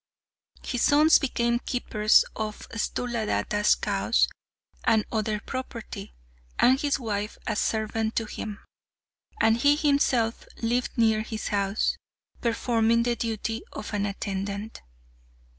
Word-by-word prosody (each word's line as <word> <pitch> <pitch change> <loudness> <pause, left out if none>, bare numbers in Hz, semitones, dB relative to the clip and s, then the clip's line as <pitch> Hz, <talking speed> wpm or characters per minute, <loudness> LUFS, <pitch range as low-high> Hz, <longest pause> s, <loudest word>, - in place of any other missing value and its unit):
His 245 -2 -2
sons 305 +2 +6
became 235 -3 0
keepers 215 -4 +3
of 215 -1 -5
Sthuladatta's 220 -2 0
cows - - +1 0.6
and 220 -2 +3
other 215 -1 -1
property, 230 - -7 0.4
and 260 +2 +5
his 285 -1 +1
wife 210 -3 -3
a 215 - -1
servant 220 +1 -1
to 225 - 0
him, 210 -1 -7 0.7
and 225 0 +4
he 285 +4 +4
himself 280 -6 +1
lived 240 +3 -1
near 220 -2 +3
his 220 0 -4
house, 200 0 0 0.4
performing 230 -1 +2
the 240 0 +1
duty 225 0 -3
of 215 - -7
an 205 0 0
attendant. 200 +1 -4
225 Hz, 115 wpm, -26 LUFS, 215-240 Hz, 0.7 s, sons